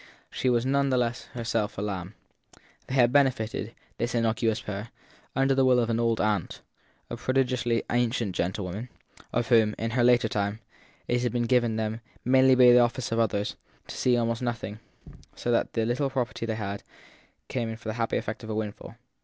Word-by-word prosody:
But - - -8
she 130 - +2
was 120 0 +2
none 140 +1 +2
the 130 - +2
less 120 0 -1
herself 115 -3 -2
a - - -2
lamb. 95 -1 -4 0.7
They 130 - -3
had 120 -2 +5
benefited, 125 -5 +1 0.2
this 120 +1 -1
innocuous 115 -1 +1
pair, 105 +2 -6 0.5
under 135 +1 +3
the 135 0 +3
will 130 -1 +5
of 115 -1 +1
an 115 - 0
old 115 -1 +1
aunt, 105 -2 -1 0.5
a - - -3
prodigiously 125 -3 0
ancient 120 -4 0
gentlewoman, 95 +6 -3 0.4
of 120 -1 -1
whom, 110 -3 +4
in 115 0 -2
her 120 +1 +2
later 120 -2 +5
time, 100 0 -2 0.5
it 120 0 +1
had 125 - 0
been 120 -1 0
given 120 -2 +2
them, 110 +1 -2 0.2
mainly 130 +1 +5
by 125 -1 +7
the 120 - +7
office 120 0 +1
of 115 - +1
others, 105 -2 0 0.3
to - - -8
see 125 -1 +2
almost 115 0 0
nothing; 115 -3 -3 0.6
so 120 - -2
that 115 - +1
the 115 -1 0
little 130 +4 0
property 125 -3 -3
they 105 -3 -3 0.7
came 120 -3 -2
in 115 - -4
for 115 -1 -7
had - - -2
the - - -9
happy 115 - 0
effect 110 +3 -5
of 110 - -8
a 110 - -2
windfall. 110 +1 -5
115 Hz, 195 wpm, -27 LUFS, 110-125 Hz, 0.7 s, by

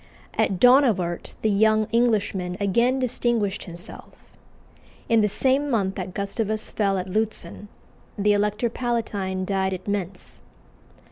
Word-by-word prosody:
At 190 - 0
Donauwert 235 -10 +3
the 220 - +3
young 215 +1 +3
Englishman 205 -6 +1
again 235 +6 +2
distinguished 240 -5 -1
himself. 175 -1 -11 0.7
In 230 -1 +4
the 210 - +3
same 265 +7 +1
month 200 -6 0
that 185 -1 -6
Gustavus 215 +2 -2
fell 200 -2 +1
at 185 - -3
Lutzen, 215 +1 -3 0.5
the 205 0 +3
Elector 210 +3 0
Palatine 205 -7 -2
died 190 -1 0
at 185 - -11
Mentz. 195 -2 -4
210 Hz, 125 wpm, -24 LUFS, 190-230 Hz, 0.7 s, In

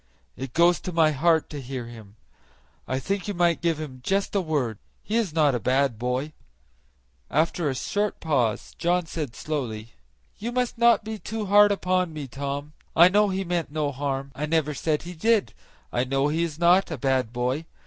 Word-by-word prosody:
It 130 -2 -7
goes 170 +1 +5
to 185 - -5
my 160 -2 +4
heart 160 +2 +2
to 145 -2 -5
hear 130 -1 -5
him. 110 -3 -12 0.7
I 130 - -1
think 195 +8 -2
you 205 - -3
might 175 -1 +2
give 165 -2 0
him 135 -5 -7
just 195 +5 0
a 200 - +2
word; 140 - -1 0.2
he 215 - -3
is 225 -7 +1
not 150 -3 +3
a 120 - 0
bad 130 0 +1
boy." 125 +5 -2 1.0
After 160 +1 +1
a 135 - -2
short 205 +9 -1
pause 130 -9 0
John 175 0 +1
said 150 -7 -5
slowly, 115 -7 -4 0.5
"You 230 +3 -3
must 250 -1 -1
not 235 -1 +5
be 220 0 -5
too 220 0 -4
hard 205 +1 +6
upon 185 -3 0
me, 150 -3 -6
Tom. 140 +3 -5 0.2
I 170 +2 +8
know 205 +2 +3
he 190 0 -1
meant 170 -5 -2
no 150 -2 -1
harm, 135 0 -3
I 145 +4 -3
never 155 -1 +1
said 150 +1 -1
he 175 +1 -7
did; 220 +5 +1 0.4
I 120 - +2
know 135 +2 +1
he 160 +3 0
is 165 -3 -2
not 175 +3 +4
a 160 - -4
bad 130 -2 0
boy. 125 +6 -1
155 Hz, 195 wpm, -25 LUFS, 135-180 Hz, 1.0 s, I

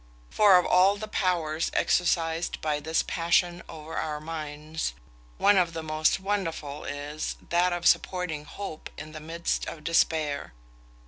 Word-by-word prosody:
For 205 -3 +7
of 180 - +2
all 190 +2 +5
the 215 +1 -6
powers 170 -6 0
exercised 165 -1 +1
by 150 -1 -1
this 160 +2 0
passion 175 +1 +1
over 155 0 -8
our 150 -1 -2
minds, 155 0 -4 0.4
one 205 - +5
of 170 -2 +1
the 165 -1 -4
most 155 +3 +1
wonderful 165 -7 -3
is 145 +2 -4
that 175 +1 +3
of 175 0 -3
supporting 175 -5 +1
hope 195 -5 -7
in 155 0 -8
the 155 - -8
midst 165 +2 -2
of 155 - -7
despair. 155 - +1
165 Hz, 145 wpm, -27 LUFS, 155-180 Hz, 0.4 s, For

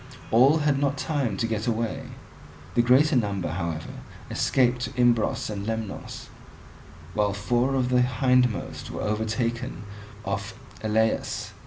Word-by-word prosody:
All 130 +7 +6
had 145 -3 +1
not 140 0 0
time 135 -10 -1
to 115 - 0
get 110 0 -2
away; 115 -1 -1 0.7
the 120 - +4
greater 130 +5 +4
number 100 -6 0
however 85 -2 -3 0.4
escaped 125 -1 +2
to 125 - -2
Imbros 120 -2 +2
and 100 -1 -5
Lemnos, 110 -3 -5 0.8
while 105 -1 +1
four 120 +6 +1
of 125 -2 +1
the 125 -1 +4
hindmost 125 -1 +1
were - - -5
overtaken 110 +1 -2 0.4
off - - -3 0.3
Elaeus. 110 +1 0
115 Hz, 130 wpm, -26 LUFS, 105-125 Hz, 0.8 s, All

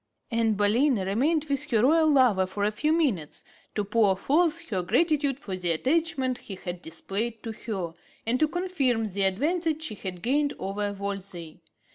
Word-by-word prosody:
Anne 230 -1 +2
Boleyn 230 +8 +3
remained 255 - +1
with 280 +1 -2
her 225 -3 +3
royal 315 +4 +5
lover 245 -10 +4
for 200 +2 -3
a 210 - +2
few 300 +9 0
minutes 255 - 0 0.3
to 210 - 0
pour 205 -2 +2
forth 325 - +2
her 190 -5 0
gratitude 280 - +1
for 195 -8 -5
the 180 -1 -2
attachment 260 - 0
he 195 - -8
had 175 -1 -6
displayed 205 +8 -4
to 225 - -4
her, 195 -7 -5 0.3
and 240 +3 +1
to 310 - +4
confirm 300 -10 0
the 200 -1 -3
advantage 315 - 0
she 270 - -2
had 185 -3 -7
gained 285 +4 +1
over 205 +1 -2
Wolsey. 195 -5 -6
225 Hz, 170 wpm, -27 LUFS, 195-295 Hz, 0.3 s, royal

